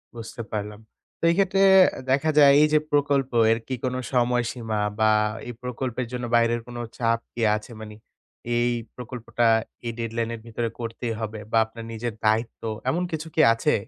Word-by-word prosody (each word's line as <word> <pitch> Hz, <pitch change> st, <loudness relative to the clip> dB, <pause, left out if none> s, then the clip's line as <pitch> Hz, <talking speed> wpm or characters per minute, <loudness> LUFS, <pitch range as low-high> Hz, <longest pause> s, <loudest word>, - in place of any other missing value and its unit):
বুঝতে 115 Hz, 0 st, -7 dB
পারলাম। 105 Hz, 0 st, -4 dB, 0.4 s
তো -, -, -22 dB
এই -, -, 0 dB
ক্ষেত্রে 195 Hz, 0 st, +2 dB, 0.5 s
দেখা 140 Hz, +4 st, +2 dB
যায় 140 Hz, -1 st, +8 dB
এই 150 Hz, -, +6 dB
যে 155 Hz, -, +6 dB
প্রকল্প 140 Hz, -2 st, +1 dB, 0.2 s
এর 115 Hz, -, +2 dB
কি 130 Hz, -, -3 dB
কোনো 125 Hz, 0 st, -1 dB, 0.2 s
সময়সীমা 120 Hz, -3 st, 0 dB, 0.2 s
বা 110 Hz, -, +4 dB, 0.4 s
এই 120 Hz, -, -5 dB
প্রকল্পের 125 Hz, 0 st, -3 dB
জন্য 125 Hz, -1 st, -4 dB
বাইরের 115 Hz, 0 st, +2 dB
কোনো 120 Hz, 0 st, -6 dB, 0.2 s
চাপ 115 Hz, -1 st, +1 dB
কি 120 Hz, -, -5 dB
আছে? 110 Hz, +3 st, -7 dB
মানে 105 Hz, 0 st, -8 dB, 0.6 s
এই 120 Hz, +1 st, +2 dB, 0.3 s
প্রকল্পটা 120 Hz, -1 st, -3 dB, 0.4 s
এ -, -, 0 dB
dead 115 Hz, -1 st, -3 dB
line 115 Hz, 0 st, -1 dB
এর -, -, -10 dB
ভিতরে 115 Hz, 0 st, -2 dB
করতেই 115 Hz, 0 st, -4 dB
হবে 110 Hz, -1 st, -5 dB
বা -, -, +3 dB
আপনার 115 Hz, +1 st, -10 dB
নিজের 115 Hz, +1 st, -4 dB
দায়িত্ব 110 Hz, +2 st, +1 dB, 0.3 s
এমন 175 Hz, +2 st, 0 dB
কিছু 160 Hz, 0 st, -4 dB
কি 160 Hz, -, +4 dB
আছে? 115 Hz, -, +1 dB
120 Hz, 175 wpm, -24 LUFS, 115-130 Hz, 0.6 s, যায়